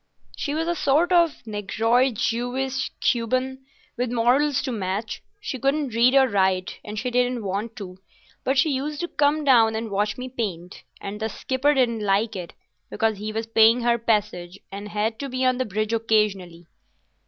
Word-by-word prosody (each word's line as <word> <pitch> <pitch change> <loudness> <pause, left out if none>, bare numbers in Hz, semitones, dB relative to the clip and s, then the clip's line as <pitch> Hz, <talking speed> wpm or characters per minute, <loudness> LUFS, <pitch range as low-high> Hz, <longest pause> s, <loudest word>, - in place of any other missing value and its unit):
"She 290 0 -3
was 325 +1 -1
a 345 - +1
sort 315 +2 +2
of 340 -7 +2
Negroid 225 +4 +1
Jewess 255 +4 -1
Cuban; 255 +2 0 0.3
with 245 0 -1
morals 260 +5 +2
to 260 - -2
match. 210 +1 -3 0.2
She 280 -11 -5
couldn't 275 0 0
read 240 +3 +4
or 265 -1 +6
write, 190 -4 0
and 210 +1 -7
she 250 +4 -2
didn't 245 -1 0
want 205 +4 -3
to, 190 -5 -9 0.4
but 265 +1 0
she 295 +4 +3
used 285 +3 -3
to 345 - -2
come 300 -1 +1
down 230 -5 +5
and 220 -1 -4
watch 205 +1 0
me 255 0 -5
paint, 190 -9 -5 0.2
and 200 +1 -6
the 220 0 -2
skipper 270 +6 0
didn't 235 -5 +1
like 205 +2 +1
it, 180 -3 -6 0.4
because 220 -2 0
he 215 +1 -4
was 225 +1 -3
paying 225 +1 +5
her 235 0 +2
passage 205 -5 -1
and 200 +1 -7
had 215 +2 -2
to 280 - -4
be 255 0 -1
on 255 0 +2
the 255 - 0
bridge 215 +2 -2
occasionally." 205 -6 0
230 Hz, 180 wpm, -24 LUFS, 210-260 Hz, 0.4 s, or